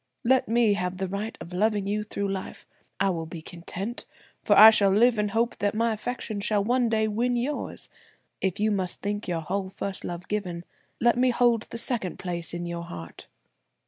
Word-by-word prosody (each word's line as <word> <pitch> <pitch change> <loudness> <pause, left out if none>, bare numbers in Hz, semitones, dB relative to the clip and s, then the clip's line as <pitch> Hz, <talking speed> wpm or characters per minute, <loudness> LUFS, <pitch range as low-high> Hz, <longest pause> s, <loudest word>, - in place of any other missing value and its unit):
Let 260 +2 +3
me 230 -2 +3
have 180 -1 -2
the 190 0 -2
right 200 +4 -4
of 175 - -9
loving 205 +1 +1
you 210 +2 -1
through 200 -2 -3
life. 190 - -7 0.3
I 195 0 +3
will 165 -2 -4
be 165 -1 -8
content; 185 +7 -6 0.4
for - - +4
I 220 +1 +11
shall 205 -2 +4
live 225 +3 +4
in 210 - +2
hope 230 +3 0
that 205 +1 0
my 230 +1 +2
affection 220 -1 -4
shall 205 0 +1
one 245 +2 +2
day 220 -1 +2
win 240 +4 0
yours. 260 +5 -3 0.5
If 190 -1 -1
you 215 +1 +2
must 190 -3 -1
think 205 +1 -2
your 170 -2 -1
whole 190 +4 -3
first 195 0 -4
love 175 +1 -6
given, 180 -5 -3 0.3
let 240 +1 +3
me 255 0 +4
hold 240 -2 +2
the - - -5
second 230 -6 -1
place 175 -2 -4
in 175 0 -4
your 170 0 -4
heart." 85 - -9
205 Hz, 200 wpm, -26 LUFS, 180-230 Hz, 0.5 s, I